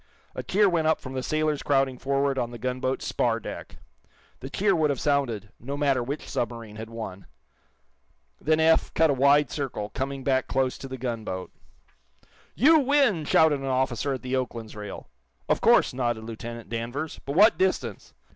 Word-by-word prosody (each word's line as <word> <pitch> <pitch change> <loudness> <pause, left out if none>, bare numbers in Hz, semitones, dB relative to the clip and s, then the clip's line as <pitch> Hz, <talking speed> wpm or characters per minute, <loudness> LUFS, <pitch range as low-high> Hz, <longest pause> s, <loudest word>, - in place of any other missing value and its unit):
A - - -4
cheer 205 +2 +3
went 165 -4 +1
up 160 - +2
from 130 - -8
the 130 - -2
sailors 155 +1 0
crowding 135 -3 +1
forward 140 0 0
on 120 -1 -1
the 120 - -8
gunboat's 130 +2 -2
spar - - 0
deck. - - -8 0.6
The 135 - -7
cheer 200 +5 +2
would 155 -2 +2
have 140 -3 -1
sounded, 120 -9 0
no 140 +4 -5
matter 140 -3 +2
which 140 +5 -5
submarine 115 -3 -4
had 110 0 -7
won. 110 -5 -7 1.1
Then 155 +1 +2
Eph 160 0 +3
cut 160 -2 +4
a - - +2
wide 140 +1 +4
circle, 125 -8 -4
coming 135 +2 -4
back 130 -1 +1
close 130 -1 0
to 135 - -7
the 130 0 -6
gunboat. 115 -7 -4 1.0
"You 315 +5 +6
win!" 275 - +2
shouted 150 -1 +4
an 135 - -6
officer 130 +1 0
at 130 - -6
the 130 +1 -2
"Oakland's" 115 -4 -4
rail. 105 -2 -8 0.4
"Of - - +1
course," - - +4
nodded 120 -3 -1
Lieutenant 115 +1 -7
Danvers, 120 +7 -4
"But 140 - -4
what 210 +5 +6
distance?" 130 - -1
135 Hz, 175 wpm, -26 LUFS, 120-150 Hz, 1.1 s, You